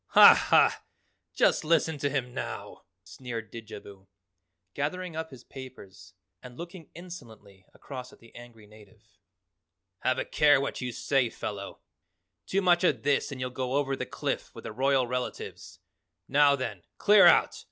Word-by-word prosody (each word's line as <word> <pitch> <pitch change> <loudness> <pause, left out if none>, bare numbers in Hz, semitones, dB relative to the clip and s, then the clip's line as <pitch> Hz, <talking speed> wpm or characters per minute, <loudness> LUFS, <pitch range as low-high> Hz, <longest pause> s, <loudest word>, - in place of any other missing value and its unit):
"Ha, - - +11
ha! - - +3 0.5
Just - - +2
listen 160 -1 +1
to 140 - 0
him 130 -3 -3
now," - - -7 0.2
sneered 115 -4 -8
Didjabo, 100 -3 -11 0.7
gathering 165 +4 -3
up 160 0 -4
his 130 -3 -13
papers 100 -9 -12 0.3
and 125 -1 -12
looking 170 -1 -9
insolently 115 - -12
across 130 -2 -9
at - - -17
the 115 - -19
angry 120 -3 -14
native. 105 0 -19 1.0
"Have 130 +1 0
a - - -2
care 145 -2 +4
what 140 - -4
you 125 0 -3
say, 130 +1 0
fellow. 100 -3 -7 0.7
Too 195 +1 0
much 175 -1 +4
of 180 - +1
this 145 +1 +1
and 135 - -7
you'll 125 0 -3
go 130 0 -3
over 140 -1 0
the - - -5
cliff - - -3
with - - -10
the - - -6
royal 130 +3 +2
relatives. 125 +1 -6 0.5
Now, 145 0 +4
then, 115 -9 -5 0.2
clear 210 0 +6
out! - - +4
130 Hz, 155 wpm, -28 LUFS, 115-145 Hz, 1.0 s, Ha